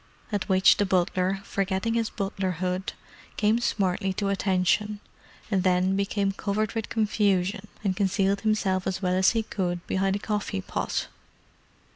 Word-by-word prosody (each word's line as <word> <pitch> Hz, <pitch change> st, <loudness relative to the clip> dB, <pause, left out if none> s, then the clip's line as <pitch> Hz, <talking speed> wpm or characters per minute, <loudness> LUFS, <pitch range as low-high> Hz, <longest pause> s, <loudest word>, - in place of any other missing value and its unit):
At 205 Hz, 0 st, -2 dB
which 190 Hz, 0 st, +5 dB
the 205 Hz, -, +2 dB
butler, 185 Hz, +1 st, +1 dB
forgetting 195 Hz, +3 st, -1 dB
his 230 Hz, -1 st, 0 dB
butlerhood, 185 Hz, -2 st, -2 dB, 0.4 s
came 215 Hz, +2 st, +3 dB
smartly 190 Hz, -4 st, 0 dB
to 200 Hz, +1 st, -1 dB
attention—and 200 Hz, +1 st, -1 dB
then 185 Hz, +1 st, +2 dB
became 200 Hz, 0 st, 0 dB
covered 205 Hz, +1 st, -2 dB
with 225 Hz, -2 st, -3 dB
confusion 205 Hz, -2 st, +1 dB, 0.2 s
and 190 Hz, -3 st, 0 dB
concealed 195 Hz, 0 st, +1 dB
himself 200 Hz, -4 st, +1 dB
as 190 Hz, +1 st, -3 dB
well 180 Hz, 0 st, +1 dB
as 185 Hz, 0 st, +4 dB
he 225 Hz, -1 st, +1 dB
could 175 Hz, -4 st, -3 dB
behind 195 Hz, 0 st, 0 dB
a -, -, 0 dB
coffee 205 Hz, -, -2 dB
pot. -, -, -2 dB
195 Hz, 140 wpm, -26 LUFS, 185-210 Hz, 0.4 s, which